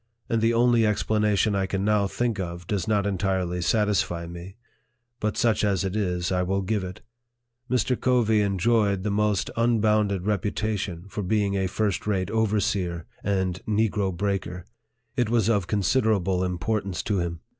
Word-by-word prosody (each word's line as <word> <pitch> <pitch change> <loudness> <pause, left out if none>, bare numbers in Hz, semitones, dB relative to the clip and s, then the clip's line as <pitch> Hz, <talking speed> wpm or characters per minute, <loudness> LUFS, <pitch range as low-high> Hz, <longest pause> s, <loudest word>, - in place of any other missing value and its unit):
And 115 -1 +1
the 115 +1 +2
only 120 -1 +4
ex 105 -1 +1
planation 105 -1 +2
I 95 -1 0
can 95 0 -2
now 105 -2 +2
think 115 0 -1
of 85 -1 -5
does 95 -2 -2
not 105 -2 +1
entirely 95 -2 -1
satisfy 100 -4 +1
me; 85 +3 -9 0.6
but 105 0 -2
such 115 -3 +2
as 100 -3 +1
it 95 +1 -3
is, 90 -4 -1
I 90 -1 +1
will 95 +2 0
give 105 +1 -1
it. 90 -1 -7 0.7
Mr. 125 +1 +1
Covey 115 -4 +3
en 100 -1 0
joyed 100 -2 +2
the 105 - -1
most 105 -5 +1
unbounded 105 -4 +2
reputation 105 -3 -2
for 105 - -5
being 100 +1 0
a 95 -1 0
first 105 +1 -1
rate 95 -3 0
overseer 100 -6 0 0.2
and 95 -2 -1
negro 105 -2 +1
breaker. 90 -1 -3 0.5
It 120 -4 +1
was 115 -3 +2
of 100 -5 0
consider 110 +3 +2
able 95 -1 0
importance 95 0 -2
to 105 -3 0
him. 85 -2 -3
100 Hz, 165 wpm, -25 LUFS, 95-110 Hz, 0.7 s, only